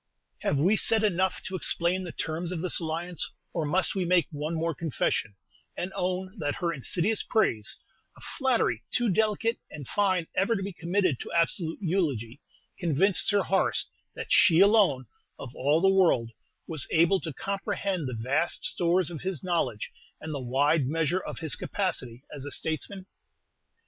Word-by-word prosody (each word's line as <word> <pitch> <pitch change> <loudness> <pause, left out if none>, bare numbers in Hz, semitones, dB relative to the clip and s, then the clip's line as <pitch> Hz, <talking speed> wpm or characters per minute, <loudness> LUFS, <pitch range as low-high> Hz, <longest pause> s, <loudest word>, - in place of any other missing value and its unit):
Have 145 - 0
we 180 +10 +3
said 220 +1 +3
enough 190 -2 +1
to 190 - -5
explain 180 +1 +2
the 175 - -6
terms 165 +3 -3
of 175 -3 -3
this 185 - +3
alliance, 170 +1 -2 0.2
or 165 -3 -1
must 180 +6 +1
we 190 -3 -1
make 175 -1 +3
one 150 +2 -3
more 165 +1 -1
confession, 135 -8 -1 0.4
and 185 +2 -4
own 185 +3 -3
that 145 -2 -1
her 170 -1 -1
insidious 175 - +1
praise 115 - 0 0.4
a - - -16 0.2
flattery 260 -4 +2
too 240 -2 +1
delicate 220 +3 +1
and 145 -4 -9
fine 185 -4 +1
ever 200 +5 +2
to 195 - -3
be 195 0 -5
committed 175 -4 0
to - - -7
absolute 165 0 +1
eulogy 145 - -1 0.4
convinced 175 +4 +1
Sir 205 -2 +3
Horace 190 - +1 0.3
that - - -3
she 165 -1 +6
alone, 195 - +5 0.3
of 125 -2 -9
all 145 +5 +2
the 195 - +4
world, 170 -12 +3 0.3
was 155 -5 0
able 170 +4 +4
to 165 - -5
comprehend 195 -1 -2
the 125 -3 -4
vast 135 +9 0
stores 175 +1 +1
of 160 - -6
his 185 -3 -4
knowledge, 185 - -1 0.3
and 160 -1 -6
the 140 - -3
wide 140 +3 +2
measure 165 +4 0
of - - -7
his 160 -3 -2
capacity 130 - -3
as 140 - -7
a 145 - -5
statesman? 175 +7 -4
170 Hz, 170 wpm, -28 LUFS, 150-190 Hz, 0.4 s, she